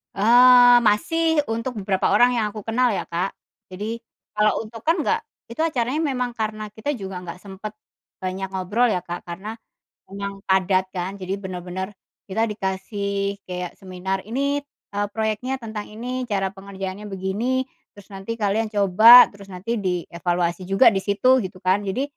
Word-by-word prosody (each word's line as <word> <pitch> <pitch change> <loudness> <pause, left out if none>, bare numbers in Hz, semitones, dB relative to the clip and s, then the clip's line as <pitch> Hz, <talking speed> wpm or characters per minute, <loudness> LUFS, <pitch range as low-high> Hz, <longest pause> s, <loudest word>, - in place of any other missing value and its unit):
Eee, 245 +3 +7
masih 305 +9 +2
untuk 230 +2 -3
beberapa 190 0 +1
orang 245 +4 +5
yang 220 - +1
aku 215 -2 -7
kenal 235 0 +1
ya, - - -2
Kak, 180 +3 -3 0.3
jadi 210 +5 -5 0.3
kalau 210 +1 +1
untuk 225 +1 -10
kan 325 +2 +4
nggak 455 +9 +1 0.3
itu 275 - -3
acaranya 275 -1 0
memang 250 -1 -2
karena 215 -1 -3
kita 220 +7 -3
juga 190 -4 -6
nggak 180 +1 -8
sempet 205 +2 -8 0.5
banyak 190 +1 -3
ngobrol 200 +6 +1
ya, 185 -5 0
Kak, 175 0 -7
karena 205 +6 -6 0.5
emang 200 0 -6
padat 190 0 +3
kan, 185 +2 -4
jadi 190 +2 -3
bener-bener 185 +1 -5 0.4
kita 220 +4 0
dikasih 200 0 -3
kayak 180 -1 -4
seminar 190 0 -4
ini, 280 +5 0 0.4
eee, 205 0 0
proyeknya 220 +4 -1
tentang 220 -2 -6
ini, 250 +3 -5
cara 195 -3 0
pengerjaannya 195 +1 -7
begini, 205 +7 -1 0.3
terus 200 - -15
nanti 195 +4 -5
kalian 210 +2 +1
coba, 215 +5 +8
terus 200 -1 -13
nanti 215 +6 -3
dievaluasi 175 -1 -2
juga 230 +5 +6
di 195 - 0
situ 235 +6 +3
gitu 185 0 -7
kan 185 +2 +2
jadi, 200 +8 -1
205 Hz, 155 wpm, -23 LUFS, 190-230 Hz, 0.5 s, coba